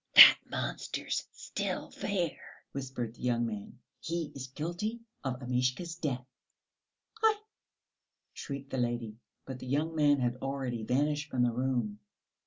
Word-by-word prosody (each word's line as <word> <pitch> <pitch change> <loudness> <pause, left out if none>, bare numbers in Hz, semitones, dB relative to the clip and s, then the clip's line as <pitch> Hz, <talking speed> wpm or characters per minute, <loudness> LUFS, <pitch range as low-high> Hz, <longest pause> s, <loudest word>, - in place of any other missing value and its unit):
"That - - +13
monster's - - -2
still - - -3
there," 180 -6 -1 0.3
whispered 130 -4 -4
the - - -17
young 120 -1 +2
man. 105 0 -5 0.2
"He 165 -2 -2
is 130 -1 -6
guilty 175 - -3 0.2
of 130 -1 -3
Amishka's 130 +7 0
death!" 140 -6 -2 1.0
"Aïe!" 440 -1 +6 1.0
shrieked 140 -1 -6
the 130 - -1
lady, 120 -2 -1 0.3
but 130 -1 -6
the 130 - -8
young 150 +5 +1
man 145 -2 +5
had 120 -1 0
already 135 -3 -2
vanished 145 +6 +1
from 125 -1 +2
the 120 - +3
room. 120 -4 -1
130 Hz, 135 wpm, -32 LUFS, 125-150 Hz, 1.0 s, That